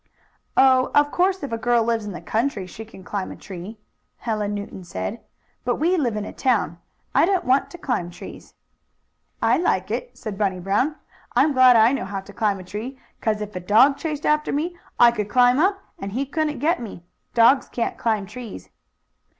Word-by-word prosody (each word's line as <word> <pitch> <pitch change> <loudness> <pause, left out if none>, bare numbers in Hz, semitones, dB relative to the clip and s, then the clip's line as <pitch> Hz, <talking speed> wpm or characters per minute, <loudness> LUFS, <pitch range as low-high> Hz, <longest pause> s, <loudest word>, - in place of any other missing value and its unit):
"Oh, 260 -1 +5
of 290 0 +4
course 375 0 +1
if 280 - -4
a 230 - -2
girl 240 0 +2
lives 225 -1 0
in 205 - -5
the 175 - -7
country 225 -4 -1
she 220 +4 -9
can 215 -4 -14
climb 195 0 -4
a - - -8
tree," 195 +3 -9 0.4
Helen 210 -3 -2
Newton 200 -2 -7
said 200 +5 -5 0.4
"But - - 0
we 345 +4 +2
live 250 -10 0
in 210 - -3
a - - -8
town. 205 -10 0 0.3
I - - +5
don't 380 -2 +1
want 260 +2 +2
to 350 - -10
climb 245 - -2
trees." 175 - -11 0.9
"I - - +4
like 355 - 0
it," - - -4
said 215 -4 -6
Bunny 190 -3 0
Brown. 205 - 0 0.4
"I'm 305 - +4
glad 255 -1 +7
I 225 +1 +6
know 275 - -2
how 195 0 -4
to 200 +1 -14
climb 205 -1 0
a 185 - -9
tree, 215 +8 -6 0.2
'cause 215 -1 0
if 210 -1 -6
a - - -2
dog 220 +10 +5
chased 300 -2 -4
after 300 0 +2
me 330 +5 -2 0.2
I 240 -1 +8
could 210 -3 -3
climb 250 +3 +4
up, 390 +4 +2 0.2
and 195 0 -5
he 265 +4 -1
couldn't 300 +1 -1
get 330 +2 +1
me. 205 -6 -8 0.3
Dogs 240 +4 +5
can't 235 - -2
climb 220 -3 0
trees." 215 - -9
230 Hz, 200 wpm, -23 LUFS, 205-280 Hz, 0.9 s, I